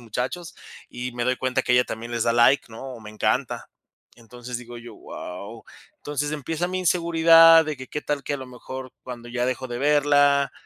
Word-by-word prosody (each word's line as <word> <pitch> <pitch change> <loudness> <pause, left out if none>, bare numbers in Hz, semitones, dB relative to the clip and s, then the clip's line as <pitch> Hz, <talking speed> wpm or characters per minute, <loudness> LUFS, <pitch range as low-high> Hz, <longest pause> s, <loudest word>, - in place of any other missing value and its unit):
muchachos, 125 +9 -5 0.4
y 125 0 -5
me 120 - -3
doy 125 0 +1
cuenta 130 0 -1
que 125 - 0
ella 125 0 +5
también 115 +1 -7
les 115 -1 -1
da 115 - +2
like, 120 +4 +4
¿no?, 110 - -10
o 115 - -11
me 105 -1 -10
encanta. 105 -1 -1 0.5
Entonces, 120 +1 -8
digo 120 0 -10
yo: 120 0 -11
"Wao". 100 +4 -9 0.3
Entonces, 145 0 -3
empieza 160 +4 -3
mi 185 0 -3
inseguridad 165 -1 +6
de 155 -1 -4
que 130 - -9
qué 150 - -5
tal 145 -2 -2
que 145 - -2
a - - -2
lo 130 - -7
mejor 130 +1 -9
cuando 120 -1 -8
ya 120 0 -1
dejo 130 0 -3
de 120 0 -5
verla, 145 -1 +3
130 Hz, 205 wpm, -24 LUFS, 120-145 Hz, 0.5 s, inseguridad